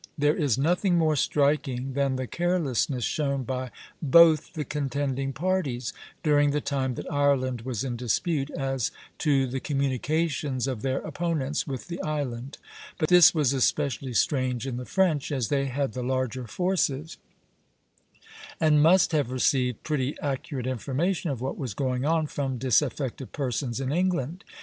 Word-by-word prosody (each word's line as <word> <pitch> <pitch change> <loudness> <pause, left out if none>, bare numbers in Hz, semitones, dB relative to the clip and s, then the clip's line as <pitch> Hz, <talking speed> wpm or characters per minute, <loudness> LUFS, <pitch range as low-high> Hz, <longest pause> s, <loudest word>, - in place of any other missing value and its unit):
There 150 +1 +3
is 140 -7 +1
nothing 175 +5 +2
more 160 -2 +3
striking 140 -2 +1
than 140 -1 +1
the 130 0 -2
carelessness 150 -6 0
shown 140 -1 -1
by 130 0 -3 0.3
both 160 +1 +5
the 155 -4 -3
contending 135 -1 -2
parties, 140 -5 -1 0.3
during 145 -2 +4
the 145 +1 +1
time 135 -3 -2
that - - -6
Ireland 135 -4 +1
was 120 -2 -3
in 125 -3 -3
dispute, 140 - -1
as 135 -4 -2 0.3
to 140 -3 +2
the 130 +1 -3
communications 140 0 -1
of 130 -5 -3
their 135 +1 -1
opponents 155 -1 -2
with 135 0 -5
the 170 -1 -5
island; 140 -3 -3 0.4
but 155 - 0
this 180 -1 +8
was 145 -4 +2
especially 135 -1 0
strange 130 -3 +1
in 130 -3 -3
the 125 - -5
French, 165 -6 +1
as 130 -7 -1
they 140 -1 +1
had 135 -2 -2
the 125 - -4
larger 130 -1 -2
forces, 165 - -1 1.4
and 155 -2 +4
must 175 +4 +5
have 150 -6 +1
received 125 -2 +1
pretty 145 -2 -1
accurate 135 -2 -3
information 145 - -1
of 130 -4 -3
what 130 - -3
was 125 -8 -4
going 130 -1 -1
on 160 0 +2
from 135 -3 -3
disaffected 130 +1 0
persons 125 -2 -2
in 135 0 -2
England. 175 - -1
140 Hz, 155 wpm, -26 LUFS, 130-155 Hz, 1.4 s, this